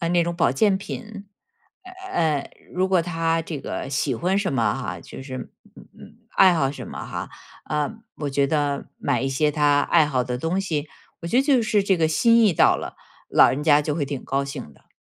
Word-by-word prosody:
呃， 170 Hz, -, -1 dB
那 175 Hz, -1 st, +3 dB
种 170 Hz, 0 st, -2 dB
保 165 Hz, -7 st, +2 dB
健 195 Hz, +8 st, +3 dB
品， 210 Hz, 0 st, -8 dB, 0.9 s
呃， 155 Hz, -4 st, 0 dB, 0.2 s
如 185 Hz, +1 st, 0 dB
果 190 Hz, -2 st, +3 dB
他 165 Hz, -1 st, 0 dB
这 155 Hz, -4 st, -6 dB
个 -, -, -5 dB
喜 135 Hz, -1 st, 0 dB
欢 180 Hz, -, 0 dB
什 200 Hz, -6 st, -1 dB
么 120 Hz, -4 st, +1 dB
哈， -, -, -5 dB
就 -, -, -10 dB
是 130 Hz, -1 st, -7 dB, 0.4 s
嗯， -, -, -13 dB
嗯， -, -, -14 dB, 0.2 s
爱 190 Hz, -2 st, +7 dB
好 135 Hz, -5 st, +1 dB
什 145 Hz, -, -8 dB
么 -, -, -7 dB
哈， -, -, -6 dB, 0.3 s
呃， 150 Hz, +3 st, -1 dB, 0.3 s
我 145 Hz, -2 st, -3 dB
觉 140 Hz, 0 st, +2 dB
得 145 Hz, -1 st, -1 dB
买 135 Hz, -3 st, 0 dB
一 135 Hz, -, 0 dB
些 150 Hz, +3 st, +1 dB
他 145 Hz, -1 st, +3 dB
爱 165 Hz, -2 st, +4 dB
好 130 Hz, -4 st, 0 dB
的 125 Hz, 0 st, -3 dB
东 165 Hz, +8 st, -1 dB
西， 155 Hz, -6 st, -3 dB, 0.3 s
我 -, -, -5 dB
觉 230 Hz, -, 0 dB
得 265 Hz, -, +5 dB
就 275 Hz, -4 st, +3 dB
是 210 Hz, -2 st, +2 dB
这 195 Hz, -2 st, +2 dB
个 160 Hz, -, +2 dB
心 230 Hz, +8 st, +4 dB
意 205 Hz, -, +4 dB
到 -, -, +4 dB
了， -, -, -7 dB, 0.3 s
老 -, -, +6 dB
人 145 Hz, +3 st, -2 dB
家 150 Hz, -1 st, +5 dB
就 150 Hz, -1 st, -2 dB
会 155 Hz, -, -1 dB
挺 140 Hz, -1 st, -5 dB
高 135 Hz, +1 st, -1 dB
兴 135 Hz, -, -7 dB
的。 -, -, -26 dB
155 Hz, 235 characters per minute, -23 LUFS, 140-185 Hz, 0.9 s, 爱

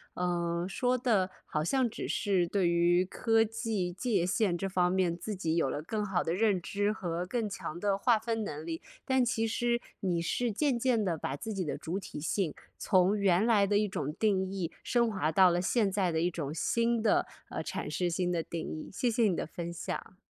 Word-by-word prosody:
嗯， 175 Hz, -1 st, -1 dB
说 250 Hz, +5 st, +1 dB
的 215 Hz, -7 st, +2 dB, 0.2 s
好 150 Hz, -, -1 dB
像 255 Hz, -, +1 dB
只 -, -, -5 dB
是 190 Hz, -5 st, +1 dB
对 190 Hz, -1 st, +1 dB
于 175 Hz, +1 st, +3 dB
科 225 Hz, +4 st, +2 dB
技、 220 Hz, -4 st, -2 dB
界 190 Hz, 0 st, 0 dB
限 190 Hz, -1 st, +1 dB
这 195 Hz, +3 st, -2 dB
方 180 Hz, -1 st, +2 dB
面 185 Hz, -2 st, +1 dB
自 210 Hz, +4 st, -4 dB
己 165 Hz, -4 st, -1 dB
有 165 Hz, -5 st, +2 dB
了 145 Hz, -, -3 dB
更 210 Hz, +6 st, -2 dB
好 190 Hz, -3 st, 0 dB
的 165 Hz, -, -1 dB
认 200 Hz, -2 st, +2 dB
知 205 Hz, +3 st, 0 dB
和 175 Hz, -4 st, -3 dB
更 220 Hz, +2 st, -2 dB
强 175 Hz, -4 st, -6 dB
的 200 Hz, 0 st, +1 dB
划 230 Hz, +3 st, +3 dB
分 225 Hz, 0 st, -2 dB
能 155 Hz, -6 st, -5 dB
力， 165 Hz, -1 st, -4 dB, 0.2 s
但 260 Hz, -2 st, +3 dB
其 230 Hz, -2 st, 0 dB
实 240 Hz, +1 st, 0 dB, 0.2 s
你 175 Hz, -3 st, 0 dB
是 235 Hz, +8 st, 0 dB
渐 265 Hz, +4 st, +1 dB
渐 235 Hz, -3 st, +2 dB
地 175 Hz, -5 st, 0 dB
把 140 Hz, -, -3 dB
自 220 Hz, +9 st, -5 dB
己 190 Hz, -3 st, -2 dB
的 150 Hz, -, -3 dB
主 180 Hz, +5 st, -3 dB
体 175 Hz, -, -8 dB
性， 165 Hz, +1 st, 0 dB, 0.2 s
从 190 Hz, +1 st, +3 dB
原 190 Hz, -1 st, +3 dB
来 220 Hz, -3 st, +4 dB
的 205 Hz, +1 st, +2 dB
一 210 Hz, -, +1 dB
种 150 Hz, -6 st, -3 dB
定 190 Hz, 0 st, +1 dB
义 180 Hz, -4 st, -3 dB
升 235 Hz, -2 st, +2 dB
华 160 Hz, -6 st, 0 dB
到 185 Hz, +3 st, +6 dB
了 175 Hz, -, +1 dB
现 200 Hz, +2 st, +1 dB
在 190 Hz, -3 st, +1 dB
的 160 Hz, -, 0 dB
一 175 Hz, -, +2 dB
种 155 Hz, -4 st, -4 dB
新 235 Hz, +7 st, +1 dB
的， 220 Hz, -, +3 dB, 0.2 s
呃 -, -, -4 dB
阐 -, -, -4 dB
释 180 Hz, -, 0 dB
新 180 Hz, +1 st, 0 dB
的 170 Hz, -2 st, 0 dB
定 165 Hz, 0 st, -5 dB
义， 155 Hz, -, -8 dB
谢 245 Hz, -, +1 dB
谢 235 Hz, +1 st, +1 dB
你 200 Hz, -5 st, +3 dB
的 -, -, -3 dB
分 170 Hz, +1 st, -6 dB
享。 170 Hz, -, -5 dB
190 Hz, 235 characters per minute, -30 LUFS, 175-220 Hz, 0.2 s, 到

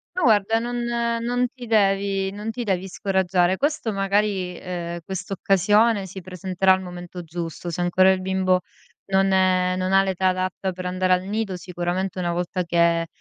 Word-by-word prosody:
Ma 365 Hz, -, -1 dB
guarda 220 Hz, -2 st, +3 dB
non 240 Hz, +1 st, -3 dB
non 235 Hz, +1 st, 0 dB
ti 250 Hz, -2 st, -9 dB
devi 195 Hz, -2 st, +2 dB
non 210 Hz, +3 st, -5 dB
ti 240 Hz, +1 st, -5 dB
devi 190 Hz, -2 st, -1 dB
scoraggiare. 185 Hz, -1 st, +1 dB
Questo 285 Hz, -2 st, -1 dB
magari, 195 Hz, -2 st, 0 dB
ehm, 175 Hz, -1 st, -5 dB
quest'occasione 200 Hz, +2 st, +2 dB
si 190 Hz, +1 st, -8 dB
presenterà 185 Hz, +1 st, +1 dB
al 190 Hz, -, -1 dB
momento 180 Hz, -1 st, -8 dB
giusto. 170 Hz, +1 st, -6 dB
Se 170 Hz, +1 st, -5 dB
ancora 185 Hz, +2 st, +4 dB
il 190 Hz, -, 0 dB
bimbo 185 Hz, 0 st, +1 dB, 0.5 s
non 195 Hz, 0 st, +2 dB
è 185 Hz, -1 st, +3 dB
non 185 Hz, +1 st, -1 dB
ha 195 Hz, 0 st, +6 dB
l'età 190 Hz, -1 st, 0 dB
adatta 185 Hz, +1 st, -2 dB
per 185 Hz, 0 st, -7 dB
andare 185 Hz, 0 st, +1 dB
al 180 Hz, 0 st, +1 dB
nido, 205 Hz, 0 st, -2 dB
sicuramente 180 Hz, +1 st, -3 dB
una 175 Hz, -1 st, -1 dB
volta 180 Hz, +1 st, -2 dB
che, 170 Hz, -1 st, +2 dB
190 Hz, 170 wpm, -23 LUFS, 180-200 Hz, 0.5 s, ha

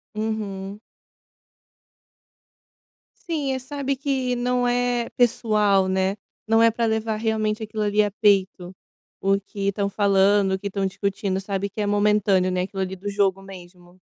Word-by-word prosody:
Uhum. 210 Hz, -2 st, -4 dB, 2.5 s
Sim, 295 Hz, -5 st, -1 dB
eh, 260 Hz, -, -2 dB
sabe 275 Hz, +1 st, -3 dB
que 260 Hz, -2 st, -1 dB
não 245 Hz, 0 st, 0 dB
é 245 Hz, -1 st, 0 dB
pessoal, 210 Hz, -5 st, +2 dB
né. 190 Hz, +1 st, 0 dB, 0.3 s
Não 225 Hz, +1 st, +4 dB
é 230 Hz, 0 st, +6 dB
pra 230 Hz, +1 st, -1 dB
levar 220 Hz, -1 st, -1 dB
realmente 220 Hz, 0 st, -1 dB
aquilo 215 Hz, 0 st, -3 dB
ali 210 Hz, 0 st, +2 dB
a 205 Hz, -, 0 dB
peito. 195 Hz, -3 st, +1 dB, 0.5 s
O 195 Hz, 0 st, +2 dB
que 200 Hz, 0 st, -5 dB
estão 200 Hz, 0 st, 0 dB
falando 200 Hz, -1 st, +3 dB
o 190 Hz, -, -1 dB
que 200 Hz, -, -4 dB
estão 195 Hz, 0 st, -2 dB
discutindo, 195 Hz, 0 st, -2 dB
sabe 195 Hz, 0 st, -3 dB
que 200 Hz, -, -10 dB
é -, -, 0 dB
momentâneo, 205 Hz, -2 st, +2 dB
né, 180 Hz, 0 st, 0 dB
aquilo 195 Hz, +1 st, -4 dB
ali 190 Hz, 0 st, -3 dB
do 190 Hz, +2 st, -9 dB
jogo 195 Hz, -1 st, +1 dB
mesmo. 180 Hz, -1 st, -14 dB
205 Hz, 155 wpm, -23 LUFS, 195-225 Hz, 2.5 s, é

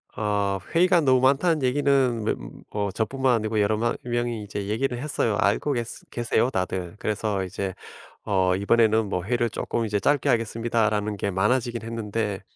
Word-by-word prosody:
어 100 Hz, -2 st, 0 dB
"회의가 175 Hz, 0 st, +4 dB
너무 130 Hz, -3 st, +4 dB
많다."는 140 Hz, +4 st, +3 dB
얘기는 130 Hz, -3 st, +2 dB
매 -, -, +1 dB, 0.4 s
뭐 100 Hz, -1 st, -2 dB
저뿐만 125 Hz, +5 st, +1 dB
아니고 110 Hz, -1 st, -1 dB
여러 105 Hz, +1 st, +2 dB
마 115 Hz, +2 st, 0 dB
명이 120 Hz, -2 st, -2 dB
이제 100 Hz, -1 st, -5 dB
얘기를 120 Hz, +4 st, -1 dB
해서요. 130 Hz, -7 st, 0 dB
알고 140 Hz, +5 st, +1 dB
계스 120 Hz, -2 st, -5 dB
계세요, 120 Hz, +1 st, +1 dB
다들. 95 Hz, -4 st, -3 dB
그래서 105 Hz, -2 st, -1 dB
이제 95 Hz, 0 st, -4 dB, 0.5 s
어 95 Hz, -3 st, +2 dB
이번에는 110 Hz, +2 st, +3 dB
뭐 90 Hz, -3 st, -2 dB
"회의를 120 Hz, +2 st, 0 dB
쪼끔 115 Hz, +1 st, -2 dB
이제 105 Hz, -1 st, 0 dB
짧게 145 Hz, +7 st, +1 dB
하겠습니다."라는 115 Hz, -2 st, 0 dB
게 100 Hz, +1 st, -2 dB
많아지긴 115 Hz, +5 st, 0 dB
했는데 110 Hz, -3 st, -3 dB
110 Hz, 370 characters per minute, -25 LUFS, 105-125 Hz, 0.5 s, 회의가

